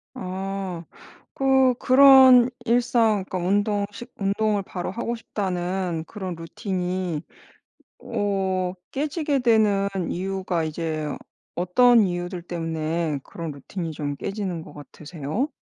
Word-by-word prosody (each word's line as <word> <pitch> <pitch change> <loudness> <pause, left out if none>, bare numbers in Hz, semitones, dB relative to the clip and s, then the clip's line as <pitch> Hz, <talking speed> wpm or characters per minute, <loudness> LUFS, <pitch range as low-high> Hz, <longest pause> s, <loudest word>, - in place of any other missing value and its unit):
아. 190 -4 -4 0.5
그 265 -1 +4
그런 260 -2 +8 0.2
일상 230 -4 +2
그러니까 185 - -3
운동 205 +3 +1
식 235 +4 -10
운동을 205 +1 +1
바로 180 -2 -5
하고 235 0 -3
싶다는 185 -5 -3
그런 185 -2 -6
루틴이 180 -1 -3 0.8
어 190 -2 -1 0.2
깨지게 295 0 -1
되는 215 -5 +3 0.2
이유가 185 -2 -2
이제 155 -1 -3 0.4
어떤 230 +7 +5
이유들 175 -1 -2
때문에 165 -2 -2
그런 165 -2 -6
루틴이 165 +4 -6
좀 145 -2 -4
깨지는 190 -2 -4
것 150 - -13
같으세요? 155 - -5
190 Hz, 235 characters per minute, -24 LUFS, 170-220 Hz, 0.8 s, 그런